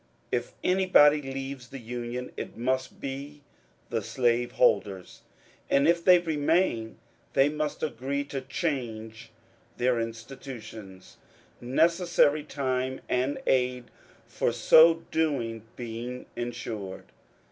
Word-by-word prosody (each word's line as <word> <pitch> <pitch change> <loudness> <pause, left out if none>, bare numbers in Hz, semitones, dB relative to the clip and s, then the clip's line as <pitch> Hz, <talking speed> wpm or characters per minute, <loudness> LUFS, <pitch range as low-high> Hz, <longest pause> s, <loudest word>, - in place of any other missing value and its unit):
If 120 -1 -2
anybody 180 -6 +5
leaves 135 -1 -6
the 135 - -8
Union, 120 +1 -5
it - - -7
must 130 +2 -1
be 140 +2 -6 0.5
the - - 0
slaveholders. 120 -6 +1 0.5
And 140 +2 +4
if 170 0 +3
they 180 0 +8
remain 160 -7 0 0.4
they 135 +2 +4
must 150 0 -3
agree 140 -1 -2
to 140 -1 -5
change 120 -8 -4 0.5
their 125 -1 +2
institutions, 115 -4 -8 0.4
necessary 160 +3 +3
time 130 -3 -2
and 130 +3 0
aid 125 -1 +1 0.3
for - - -1
so 160 +8 +6
doing 120 -9 -1
being 120 +1 -6
ensured. 115 -5 -5
130 Hz, 105 wpm, -28 LUFS, 120-145 Hz, 0.5 s, they